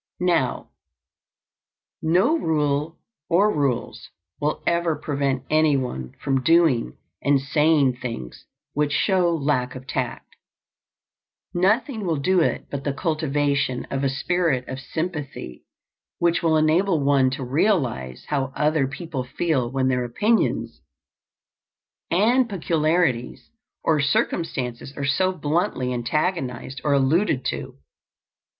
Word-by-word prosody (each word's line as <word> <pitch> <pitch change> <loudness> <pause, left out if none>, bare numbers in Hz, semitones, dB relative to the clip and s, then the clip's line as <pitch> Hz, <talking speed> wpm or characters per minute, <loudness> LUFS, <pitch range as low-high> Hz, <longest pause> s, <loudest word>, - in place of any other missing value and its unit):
Now, 170 -8 0 1.3
no 185 - +3
rule 150 - 0 0.3
or 200 +5 +3
rules 140 -5 -2 0.3
will 150 +1 -1
ever 170 -2 +1
prevent 140 -3 -1
anyone 135 - +1
from 135 -1 0
doing 160 - +3 0.2
and 140 -1 +3
saying 145 -2 +2
things 115 - -7 0.3
which 150 0 0
show 185 -1 +2
lack 140 -6 0
of 130 0 -9
tact. 130 -2 -4 1.2
Nothing 215 +6 +1
will 170 -4 0
do 185 +6 +2
it 165 - 0
but 140 -1 -4
the 140 - -1
cultivation 145 -5 0
of 135 0 -1
a 135 - +2
spirit 150 -2 0
of 130 - -5
sympathy 150 - -5 0.5
which 170 -1 +2
will 160 -2 +3
enable 160 +1 +2
one 140 -2 +4
to 130 +1 -4
realize 125 - 0
how 135 -2 -1
other 150 -2 +2
people 140 -1 -5
feel 130 -1 -1
when 130 0 0
their 125 -1 +1
opinions 210 - 0 1.3
and 235 +7 +3
peculiarities 160 - 0 0.3
or 155 -2 +2
circumstances 140 - -1
are 140 - -2
so 185 +7 +2
bluntly 150 -6 -1
antagonized 130 0 -2
or 145 - +2
alluded 140 +1 +2
to. - - -4
145 Hz, 115 wpm, -23 LUFS, 130-170 Hz, 1.3 s, one